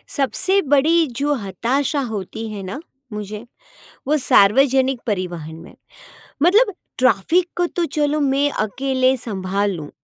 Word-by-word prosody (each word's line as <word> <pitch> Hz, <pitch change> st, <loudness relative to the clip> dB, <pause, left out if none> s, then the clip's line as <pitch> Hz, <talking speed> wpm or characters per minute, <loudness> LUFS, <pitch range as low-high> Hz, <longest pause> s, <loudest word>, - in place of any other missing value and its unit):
सबसे 370 Hz, -, +2 dB
बड़ी 310 Hz, +3 st, +3 dB
जो 290 Hz, +2 st, 0 dB
हताशा 250 Hz, -, -1 dB
होती 220 Hz, -2 st, -5 dB
है 205 Hz, -2 st, -6 dB
ना 190 Hz, +8 st, -6 dB, 0.3 s
मुझे, 210 Hz, +1 st, -6 dB, 0.6 s
वो 305 Hz, +2 st, +2 dB
सार्वजनिक 260 Hz, +3 st, +3 dB
परिवहन 175 Hz, -6 st, -4 dB
में, 165 Hz, -, -13 dB, 0.7 s
मतलब 410 Hz, +4 st, +4 dB, 0.2 s
ट्रैफ़िक 260 Hz, -, +2 dB
को 350 Hz, -, +2 dB
तो 345 Hz, -1 st, -2 dB
चलो 300 Hz, 0 st, +1 dB
मैं 280 Hz, 0 st, +1 dB
अकेले 260 Hz, +4 st, +1 dB
संभाल 200 Hz, -3 st, -2 dB
लूँ, 155 Hz, -5 st, -7 dB
260 Hz, 125 wpm, -20 LUFS, 205-290 Hz, 0.7 s, मतलब